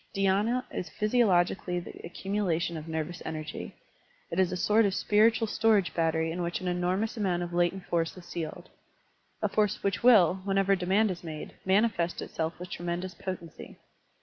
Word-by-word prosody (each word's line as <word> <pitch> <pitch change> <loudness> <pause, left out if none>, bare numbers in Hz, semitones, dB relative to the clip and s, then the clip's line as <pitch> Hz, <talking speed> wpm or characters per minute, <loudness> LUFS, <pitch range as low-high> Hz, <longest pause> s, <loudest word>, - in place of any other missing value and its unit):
DhySna 200 +6 +2
is 175 - -4
physiologically 190 -5 +2
the 175 - -8
acctmiulation 175 -2 -1
of 155 0 -7
nervous 160 +2 -4
energy; 155 -1 -6 0.6
it 170 - -1
is 185 -1 +3
a 185 - -2
sort 215 +5 +4
of 195 -1 0
spiritual 220 +2 +3
storage 215 -3 +2
battery 160 -1 +1
in 175 +2 -3
which 170 0 -2
an 185 - -5
enormous 180 +6 0
amotmt 180 -4 0
of 175 0 -6
latent 175 +2 +1
force 165 +1 -1
is 180 - -11
sealed, 160 -3 -6 0.4
— - - -41
a - - +4
force 210 -2 0
which 200 0 0
will, 190 -7 +6
whenever 195 0 +2
demand 195 +3 +2
is 175 -1 -7
made, 155 -2 -7
manifest 190 -3 +2
itself 160 +1 -3
with 180 0 -9
tremendous 175 +1 -3
potency. 175 -4 -7
180 Hz, 170 wpm, -29 LUFS, 170-200 Hz, 0.6 s, will